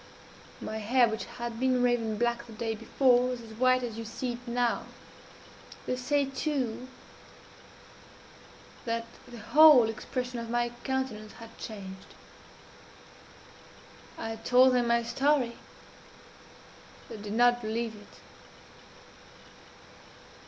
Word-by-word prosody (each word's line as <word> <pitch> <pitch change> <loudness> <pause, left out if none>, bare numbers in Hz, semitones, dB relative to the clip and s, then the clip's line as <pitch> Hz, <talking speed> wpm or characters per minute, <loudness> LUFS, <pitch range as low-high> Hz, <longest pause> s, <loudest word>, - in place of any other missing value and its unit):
My 220 - -5
hair, 240 +3 +3
which 220 0 -4
had 235 -1 -6
been 255 -1 +2
raven 230 -3 +1
black 235 0 -1
the 225 - -11
day 225 +1 -3
before, 245 +3 +2
was 250 -1 -3
as 225 -2 -11
white 255 +2 +3
as 230 -2 -5
you - - -4
see 240 +3 -4
it 245 +1 -11
now. 240 0 0 1.0
They 255 - -1
say 280 +3 +1
too 265 -3 -3 2.0
that 230 0 -2 0.2
the 240 -1 -10
whole 265 +2 +7
expression 250 +2 -4
of 230 0 -6
my 240 0 0
countenance 260 -6 -3
had 230 -1 -12
changed. 190 -3 -9 2.0
I 225 0 -5
told 250 +3 +5
them 245 -1 +2
my 235 0 +2
story 250 0 +1 1.5
they - - -8
did 205 0 -6
not 240 +1 +4
believe 225 0 -3
it. 205 0 -16
240 Hz, 115 wpm, -29 LUFS, 225-255 Hz, 2.0 s, whole